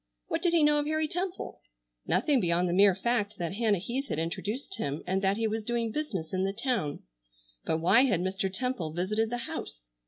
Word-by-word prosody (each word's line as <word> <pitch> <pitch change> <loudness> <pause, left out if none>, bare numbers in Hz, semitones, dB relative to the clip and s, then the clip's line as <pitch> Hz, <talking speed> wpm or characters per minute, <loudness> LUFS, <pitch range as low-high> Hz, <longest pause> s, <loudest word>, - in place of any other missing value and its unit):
What - - -1
did 350 -2 +2
he 330 -3 +5
know 295 0 +4
of 295 - -1
Harry 310 0 +1
Temple? 360 +3 -4 0.5
Nothing 260 - +3
beyond 175 -2 +2
the 175 - 0
mere 195 0 +6
fact 215 0 0
that 170 -2 -3
Hannah 215 -1 +2
Heath 245 +10 -3
had - - -3
introduced 205 - -3
him 145 +1 -2
and 190 +1 0
that 195 +1 +2
he 225 - 0
was 220 0 -1
doing 235 0 -1
business 215 - -3
in 185 0 +1
the 195 0 0
town. 230 - -2 0.6
But 160 - +1
why 215 +10 +6
had 205 -10 +1
Mr. 190 +1 -1
Temple 190 -7 -2
visited 210 +6 0
the 245 - -2
house? - - -7
210 Hz, 210 wpm, -29 LUFS, 180-255 Hz, 0.6 s, mere